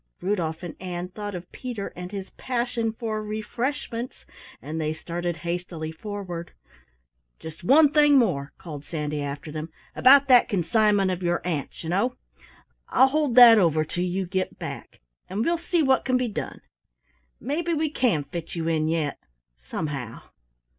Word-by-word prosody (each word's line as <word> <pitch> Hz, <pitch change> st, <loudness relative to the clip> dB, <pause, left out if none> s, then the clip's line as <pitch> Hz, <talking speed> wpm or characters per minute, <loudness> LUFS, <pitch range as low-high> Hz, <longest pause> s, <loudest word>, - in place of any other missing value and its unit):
Rudolf 175 Hz, -4 st, -2 dB
and 170 Hz, -3 st, -6 dB
Ann 180 Hz, -1 st, -4 dB
thought 205 Hz, +1 st, -6 dB
of 175 Hz, +1 st, -8 dB
Peter 240 Hz, -6 st, -5 dB
and 180 Hz, +1 st, -7 dB
his 195 Hz, -2 st, -6 dB
passion 240 Hz, -2 st, -2 dB
for 220 Hz, -1 st, -3 dB
"refreshments", 230 Hz, +3 st, -4 dB, 0.3 s
and 160 Hz, +2 st, -5 dB
they 155 Hz, 0 st, -1 dB
started 175 Hz, +1 st, -4 dB
hastily 170 Hz, -2 st, -3 dB
forward. 180 Hz, -1 st, -6 dB, 0.8 s
"Just 160 Hz, +2 st, -10 dB
one 285 Hz, -, +6 dB
thing 295 Hz, -2 st, +6 dB
more," 140 Hz, -, +1 dB
called 150 Hz, -4 st, -8 dB
Sandy 150 Hz, -2 st, -3 dB
after 145 Hz, +2 st, -5 dB
them. 155 Hz, +1 st, -5 dB, 0.3 s
"About 275 Hz, +2 st, +7 dB
that 250 Hz, -3 st, +6 dB
consignment 200 Hz, +1 st, +2 dB
of 180 Hz, 0 st, -3 dB
your 175 Hz, -1 st, +1 dB
aunt's, 155 Hz, -3 st, -3 dB
you 160 Hz, -, -4 dB
know! 235 Hz, +8 st, +1 dB, 0.7 s
I'll 265 Hz, -, +5 dB
hold 290 Hz, -4 st, +1 dB
that 235 Hz, -3 st, +10 dB
over 160 Hz, -4 st, +3 dB
till 175 Hz, +3 st, -3 dB
you 185 Hz, +1 st, -1 dB
get 185 Hz, +1 st, -2 dB
back, -, -, -8 dB, 0.3 s
and 205 Hz, +4 st, -1 dB
we'll 340 Hz, 0 st, +1 dB
see 340 Hz, -1 st, +1 dB
what 265 Hz, -2 st, +3 dB
can 255 Hz, -1 st, +2 dB
be 250 Hz, -1 st, 0 dB
done. 210 Hz, -, -5 dB, 0.8 s
Maybe 315 Hz, +6 st, -2 dB
we 310 Hz, -1 st, 0 dB
can 225 Hz, -, +1 dB
fit 165 Hz, +5 st, -7 dB
you 165 Hz, -1 st, -2 dB
in 155 Hz, -1 st, +1 dB
yet, 160 Hz, -3 st, -1 dB, 0.4 s
somehow. 130 Hz, -, -5 dB
185 Hz, 160 wpm, -25 LUFS, 160-240 Hz, 0.8 s, that